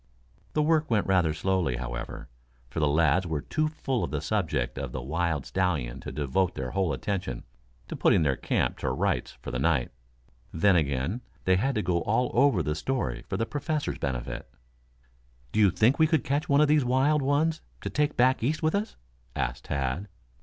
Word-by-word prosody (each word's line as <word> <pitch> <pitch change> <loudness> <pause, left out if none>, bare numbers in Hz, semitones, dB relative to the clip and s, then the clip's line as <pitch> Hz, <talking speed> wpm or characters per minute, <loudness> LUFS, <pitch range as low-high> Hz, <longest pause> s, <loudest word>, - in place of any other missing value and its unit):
The 150 - +2
work 155 0 +2
went 110 -4 +2
rather 90 -4 +3
slowly, 85 -4 0
however, - - -5 0.4
for 80 - -3
the 75 - +3
lads 80 +4 +3
were 80 -3 -2
too 155 0 0
full 135 -5 -2
of - - -2
the 75 - -2
subject 75 - -1
of 65 -2 -4
the 65 - -4
wild 80 0 -1
stallion 80 -11 -1
to - - -7
devote 85 +6 0
their 65 -1 -4
whole 95 0 0
attention 70 -1 -3 0.4
to - - -5
putting - - +3
their 70 -3 +2
camp - - -1
to - - -1
rights - - -1
for - - -5
the 60 - -2
night. 70 -3 +1 0.6
Then 95 +4 +3
again, 75 - 0 0.2
they 95 - +4
had 135 +7 0
to 110 - 0
go 85 -1 +1
all 115 +7 +1
over 120 - +4
the 75 - -1
story 130 +12 -2
for - - -1
the 115 - 0
Professor's 145 +2 -2
benefit. 65 -4 -4 1.0
"Do - - 0
you 105 -2 +6
think 115 - +3
we 160 - +6
could 155 -6 +2
catch 140 +3 -1
one 140 +1 +5
of 150 - +5
these 150 -1 +4
wild 135 +4 +2
ones 150 +4 +1 0.2
to - - -4
take 150 +1 0
back 130 +2 +4
East 150 +7 -1
with 155 - +2
us?" 205 +2 -1 0.4
asked - - -2
Tad. 70 +7 -2
95 Hz, 195 wpm, -27 LUFS, -, 1.0 s, you